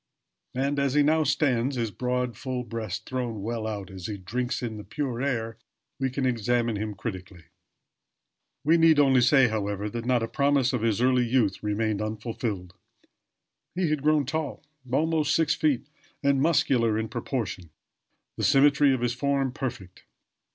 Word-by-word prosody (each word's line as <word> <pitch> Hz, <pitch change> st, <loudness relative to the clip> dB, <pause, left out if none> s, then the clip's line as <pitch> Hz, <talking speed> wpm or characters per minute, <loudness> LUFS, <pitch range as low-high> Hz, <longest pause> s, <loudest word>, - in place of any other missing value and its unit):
And 140 Hz, +2 st, 0 dB
as 140 Hz, -1 st, +1 dB
he 150 Hz, -, +5 dB
now 155 Hz, +2 st, +3 dB
stands, 135 Hz, -3 st, +1 dB
his 115 Hz, -3 st, -2 dB
broad 125 Hz, +3 st, -2 dB
full 130 Hz, +1 st, -4 dB
breast 115 Hz, -5 st, -5 dB
thrown 120 Hz, -5 st, -3 dB
well 115 Hz, 0 st, -3 dB
out 100 Hz, -3 st, -5 dB
as 95 Hz, -2 st, -7 dB
he 105 Hz, -, -4 dB
drinks 125 Hz, +7 st, -3 dB
in 110 Hz, -3 st, -4 dB
the 105 Hz, -, -8 dB
pure 130 Hz, -3 st, -3 dB
air, 115 Hz, -5 st, -2 dB, 0.4 s
we 135 Hz, -1 st, 0 dB
can 130 Hz, +1 st, -2 dB
examine 120 Hz, -1 st, +1 dB
him 105 Hz, 0 st, -4 dB
critically. 95 Hz, -4 st, -7 dB, 1.2 s
We 165 Hz, +3 st, +4 dB
need 165 Hz, -1 st, +6 dB
only 135 Hz, -3 st, +5 dB
say, 135 Hz, +1 st, +5 dB
however, 105 Hz, -1 st, -2 dB
that 115 Hz, +1 st, -5 dB
not 125 Hz, -2 st, +2 dB
a -, -, -1 dB
promise 140 Hz, 0 st, +2 dB
of 125 Hz, -, 0 dB
his 115 Hz, -1 st, +1 dB
early 125 Hz, -1 st, +3 dB
youth 115 Hz, -5 st, +1 dB
remained 105 Hz, 0 st, -1 dB
unfulfilled. 110 Hz, -4 st, -4 dB, 1.0 s
He 180 Hz, -4 st, 0 dB
had 155 Hz, -2 st, 0 dB
grown 150 Hz, -1 st, +3 dB
tall 155 Hz, +1 st, -3 dB, 0.3 s
almost 155 Hz, +2 st, +1 dB
six 160 Hz, 0 st, +3 dB
feet 150 Hz, -6 st, 0 dB, 0.4 s
and 140 Hz, -1 st, +3 dB
muscular 125 Hz, -8 st, +2 dB
in 110 Hz, 0 st, -2 dB
proportion; 110 Hz, -, -4 dB, 0.7 s
the -, -, -3 dB
symmetry 140 Hz, 0 st, +5 dB
of 125 Hz, -, -5 dB
his 120 Hz, -1 st, 0 dB
form 135 Hz, 0 st, 0 dB
perfect. 120 Hz, -9 st, -6 dB
125 Hz, 165 wpm, -26 LUFS, 110-140 Hz, 1.2 s, need